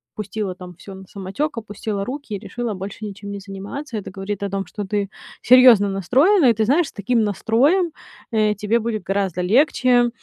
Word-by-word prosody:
пустила 205 -2 -4
там 180 -1 -10
всё 195 -1 -10
на 190 - -11
самотёк, 210 +9 -4
опустила 205 -1 -4
руки 260 -1 -6
и - - -5
решила 240 0 -4
больше 200 +3 -7
ничем 200 0 -8
не 200 - -5
заниматься. 200 +7 -7
Это 205 - -6
говорит 195 +1 -4
о 200 - -2
том, 195 0 -3
что 205 +3 -6
ты 200 0 -2 0.4
серьёзно 250 -5 +8
настроена. 270 - +3
И, - - +5
ты 220 0 0
знаешь, 295 +6 +2
с - - -11
таким 225 +3 0
настроем, 275 - +2 0.4
э, 215 -1 +2
тебе 225 +3 +2
будет 225 -1 -3
гораздо 190 -3 -1
легче, 245 - +3
210 Hz, 190 wpm, -21 LUFS, 195-245 Hz, 0.4 s, серьёзно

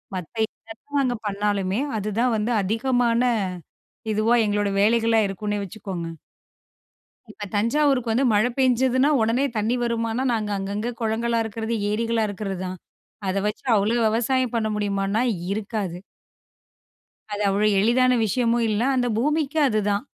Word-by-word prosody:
மத்த 180 +4 -7
என்னதான் 225 +8 -6
நாங்க 245 -3 0
பண்ணாலுமே, 200 0 -1 0.2
அதுதான் 225 +4 0
வந்து 225 +3 0
அதிகமான, 235 +3 +1 0.9
இதுவா 220 +3 +3
எங்களோட 205 0 0
வேலைகளா 225 +1 +3
இருக்குன்னே 205 +2 -3
வச்சுக்கோங்க. 190 -3 -6 1.2
இப்ப 205 - -8
தஞ்சாவூருக்கு 250 +2 +2
வந்து 260 +4 +2
மழ 210 +2 +3
பெஞ்சதுன்னா 260 +2 +3
உடனே 230 +5 +2
தண்ணி 220 +3 +1
வருமானா, 230 0 -1
நாங்க 215 -2 -1
அங்கங்க 205 +4 -3
குளங்களா 230 +1 0
இருக்கிறது, 225 +1 -3 0.2
ஏரிகளா 225 +1 0
இருக்கிறது 195 -1 -4
தான். 185 0 -6 0.5
அத 190 - -1
வச்சு 210 - -4
அவ்வளோ 215 +4 +1
விவசாயம் 245 +2 0
பண்ண 220 -1 0
முடியுமான்னா 200 +1 0 0.3
இருக்காது. 200 -4 -3 1.4
அது 205 - -2
அவ்ளோ 205 +2 +2
எளிதான 250 +4 +3
விஷயமும் 235 +2 +1
இல்ல. 210 - 0 0.2
அந்த 245 -1 +1
பூமிக்கும் 300 +2 +1
அதுதான். 210 +1 0
225 Hz, 125 wpm, -23 LUFS, 205-240 Hz, 1.4 s, இதுவா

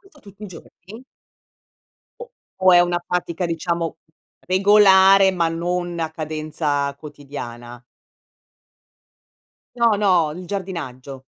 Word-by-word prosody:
Questo 355 -8 -23
tutti 200 0 -17
i - - -6
giorni? 200 +5 -14 1.2
O 480 - -10 0.3
o 185 -1 +4
è 175 - +7
una 175 0 +1
pratica 180 0 -3
diciamo, 170 0 -3 0.5
regolare 195 0 +5
ma 170 -3 0
non 175 +1 -3
a 160 -1 -3
cadenza 155 -2 -3
quotidiana? 120 -5 -10 1.9
No, 235 -2 +3
no, 185 -6 +2
il 180 +1 -9
giardinaggio. 140 -9 -7
175 Hz, 105 wpm, -20 LUFS, 155-190 Hz, 1.9 s, è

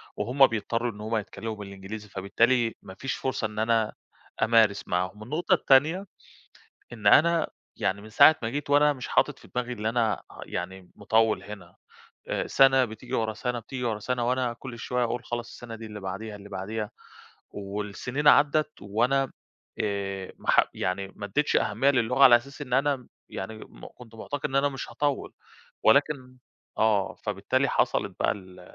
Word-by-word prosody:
وهُم 135 +3 +4
بيضطروا 115 +1 -2
إن 105 -1 -11
هُم 110 +1 -1
يتكلموا 110 +2 -5
بالإنجليزي، 100 +1 -8
فبالتالي 115 +5 +1
ما 95 - -11
فيش 135 - -2
فرصة 130 -4 -2
إن 105 0 -7
أنا 110 -1 +1 0.5
أمارس 110 -3 +3
معاهم. 90 +4 -2
النقطة 155 +9 0
التانية 155 +8 +4 0.9
إن 110 -3 -2
أنا 165 +7 +5 0.3
يعني 100 +1 -1
من 110 - -11
ساعة 140 +8 +7
ما 115 - -1
جيت 145 +4 -4
وأنا 145 +1 +5
مش 130 -3 -7
حاطط - - +1
في - - -16
دماغي 125 0 -1
إن 105 -3 -7
أنا 115 -1 +1 0.2
يعني 95 +1 -6
مطوّل 110 -3 +2
هنا، 100 -4 -10 0.5
آآ - - -1
سنة 135 -1 +5
بتيجي 120 +2 -7
ورا 110 -2 0
سنة 125 +2 -3
بتيجي 125 +2 -6
ورا 110 -3 -1
سنة 120 +2 -1
وأنا 125 -1 0
كل 120 0 -9
شوية 125 +1 -1
أقول 120 +1 -3
خلاص 120 0 -4
السنة 115 -2 -9
دي 115 0 -9
اللي 105 -1 -8
بعديها 100 +3 -6
اللي 100 0 -12
بعديها، 105 +2 -4 0.6
والسنين 105 +8 -2
عدّت 150 +2 +4
وأنا 125 +7 +1 0.5
آآ 100 -2 -3
ما - - 0
ح - - +6
يعني 95 +2 -2
ما 100 - -7
أدّيتش 145 +9 +1
أهمية 115 +7 +2
للغة 125 +1 +3
على 120 -3 +9
أساس 140 +5 -7
إن 125 -4 -9
أنا 135 -1 +1 0.2
يعني 110 - -5
م - - -12
كنت 115 -2 -14
معتقد 145 +6 -4
إن 135 - -1
أنا 140 +1 +3
مش 135 -2 -6
هاطوّل. 145 -2 -2 0.5
ولكن 140 -3 +3 0.4
آه، 105 -3 +2
فبالتالي - - 0
حصلت - - 0
بَقى - - +3
ال 95 -2 -12
115 Hz, 170 wpm, -27 LUFS, 105-130 Hz, 0.9 s, على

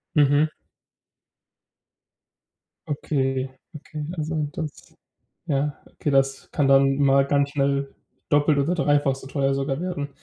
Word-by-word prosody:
Mhm. 145 +1 +4 2.4
Okay, 135 -3 -1 0.3
okay, 150 0 -7
also 155 -1 -1
das 155 -3 -7 0.5
ja, 145 0 -1
okay, 145 - -3
das 135 0 +1
kann 145 -3 +1
dann 135 0 +5
mal 140 -1 +4
ganz 140 0 +2
schnell 140 -1 0 0.4
doppelt 145 0 +3
oder 165 +6 +1
dreifach 145 -4 +2
so 135 - -11
teuer 135 -1 0
sogar 135 +2 -2
werden. 150 -6 -3
140 Hz, 115 wpm, -24 LUFS, 135-150 Hz, 2.4 s, dann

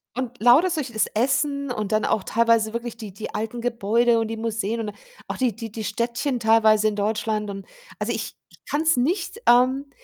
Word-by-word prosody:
und 250 -1 -4
lauter 260 +10 +6
solches 300 -8 -3
das 220 - +1
Essen 280 +3 0
und 215 -3 -3
dann 215 0 +2
auch 210 - 0
teilweise 230 -1 +2
wirklich 235 -1 -5
die 210 -5 -8
die 215 +2 -7
alten 225 +2 -4
Gebäude 235 0 +2
und 225 - -1
die 225 0 -5
Museen 225 0 -2
und 210 -2 -5 0.3
auch - - -4
die 245 -6 0
die 225 -2 -7
die 220 0 -6
Städtchen 235 +5 -2
teilweise 220 -1 +4
in 210 - -1
Deutschland 210 0 -1
und, 195 -1 -7 0.3
also, - - -1
ich - - -5 0.2
ich - - -19
kann's 315 0 +2
nicht 360 - -1
ähm, 260 +3 +4
230 Hz, 195 wpm, -23 LUFS, 215-250 Hz, 0.3 s, lauter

